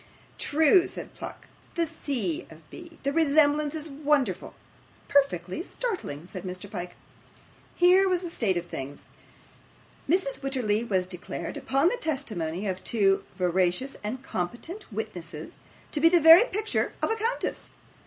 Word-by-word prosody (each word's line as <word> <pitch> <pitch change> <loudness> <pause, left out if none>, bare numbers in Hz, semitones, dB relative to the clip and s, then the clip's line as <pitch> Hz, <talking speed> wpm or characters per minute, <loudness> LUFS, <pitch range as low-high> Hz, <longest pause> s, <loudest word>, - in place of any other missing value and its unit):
'True,' 320 +5 +4
said - - -7
Pluck, - - -9 0.3
'the 340 -1 +2
C. 265 - -3
of 160 -1 -15
B. 335 -2 -11
The 280 0 0
resemblance 300 -1 +3
is 315 0 -4
wonderful!' 280 - 0 0.5
'Perfectly 190 - +1
startling,' 360 - -4
said 185 0 -7
Mr. 185 +1 -6
Pyke. 175 -3 -6 0.8
Here 370 +2 +5
was 365 -1 +1
a 345 - -5
state 195 - 0
of 175 - -3
things! 140 -3 -7 1.0
Mrs. 340 -5 +1
Wititterly 245 -6 0
was 190 -5 0
declared, 180 -1 -6
upon 275 +6 +2
the - - -2
testimony 215 - -3
of 190 -2 -3
two 195 -4 +2
veracious 180 +7 +1
and 250 +5 -4
competent 250 - -5
witnesses, 175 -8 -6 0.3
to 300 - 0
be 330 - +7
the 350 0 +5
very 325 +7 +9
picture 435 -2 -1
of - - +2
a - - +2
countess! 450 +2 -2
270 Hz, 145 wpm, -27 LUFS, -, 1.0 s, very